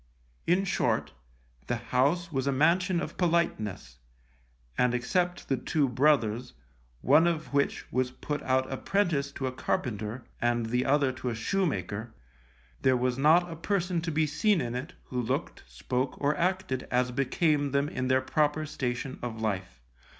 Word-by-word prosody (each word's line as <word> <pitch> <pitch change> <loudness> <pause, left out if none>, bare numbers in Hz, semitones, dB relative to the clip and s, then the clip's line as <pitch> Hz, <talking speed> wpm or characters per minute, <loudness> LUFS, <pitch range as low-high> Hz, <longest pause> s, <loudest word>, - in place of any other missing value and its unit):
In 185 +3 +3
short, 185 - 0 0.5
the 120 - 0
house 135 +9 +1
was 135 -2 -1
a - - +3
mansion 170 +6 +3
of - - -6
politeness, 165 - 0 0.8
and 125 -1 +2
except 175 +9 -1
the 135 - +1
two 140 +3 +1
brothers, 125 -3 +2 0.5
one 155 +6 +5
of 160 -4 -2
which 140 0 +1
was 130 0 +1
put 145 +3 -4
out 130 -1 +1
apprentice 140 -1 0
to 135 - -4
a 130 - -1
carpenter, 115 -2 -3 0.2
and 120 -1 +1
the 125 +3 0
other 140 -1 +3
to 130 -1 -4
a 115 - -3
shoemaker, 110 - -2 0.7
there 130 -1 +4
was 125 +1 0
not 170 +5 +4
a - - -5
person 180 0 -1
to 165 0 -3
be 155 +1 +2
seen 195 +6 +2
in 120 -4 -2
it 130 +8 -5
who 125 -1 -3
looked, 115 - -3
spoke 125 - -3
or 145 +1 +1
acted 180 -7 -1
as 125 0 +1
became 145 +3 +1
them 140 +1 +1
in 130 -3 -3
their 130 0 +3
proper 150 +3 +1
station 130 -1 -3
of 115 -2 -5
life. 95 - -3
135 Hz, 160 wpm, -29 LUFS, 125-160 Hz, 0.8 s, one